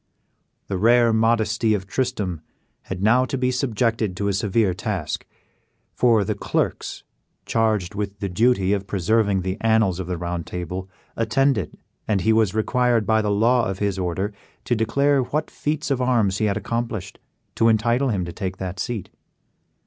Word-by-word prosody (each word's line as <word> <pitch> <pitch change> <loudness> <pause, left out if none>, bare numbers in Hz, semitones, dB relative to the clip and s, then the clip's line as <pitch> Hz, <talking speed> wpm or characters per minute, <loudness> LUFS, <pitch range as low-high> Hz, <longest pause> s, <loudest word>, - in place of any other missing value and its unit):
The 95 -2 -3
rare 120 +2 +5
modesty 115 0 +2
of 95 -2 -4
Tristram 100 - -2 0.4
had 95 0 -5
now 120 +4 +5
to 135 - -3
be 130 0 +1
subjected 115 -6 0
to 100 0 0
a - - 0
severe 100 0 +1
task; 90 - -4 0.7
for 115 -4 +3
the 105 - -1
clerks 100 - -2 0.4
charged 110 -5 0
with 100 -1 -4
the 100 - -2
duty 100 0 +2
of 100 -1 -2
preserving 100 +1 +1
the 95 +1 -2
annals 110 -5 +2
of 90 - -4
the 90 -1 -2
Round 85 0 -4
Table 90 +2 -5 0.3
attended, 115 - +1 0.3
and 105 -3 +1
he 110 +3 +3
was 110 -3 +2
required 120 0 +2
by 110 +2 +3
the 105 - -1
law 115 +4 +3
of 95 - -3
his 100 -1 -1
order 95 +3 -2 0.3
to 120 - +1
declare 140 +5 +2
what 150 +5 -2
feats 150 0 -2
of 130 -2 +1
arms 115 -6 +2
he 110 - +2
had 100 -1 +1
accomplished 110 -4 -4 0.3
to 115 - +2
entitle 120 +4 +2
him 95 -6 -1
to 85 - -7
take 95 -1 -4
that 95 0 -5
seat. 115 -4 -4
110 Hz, 170 wpm, -23 LUFS, 95-120 Hz, 0.7 s, rare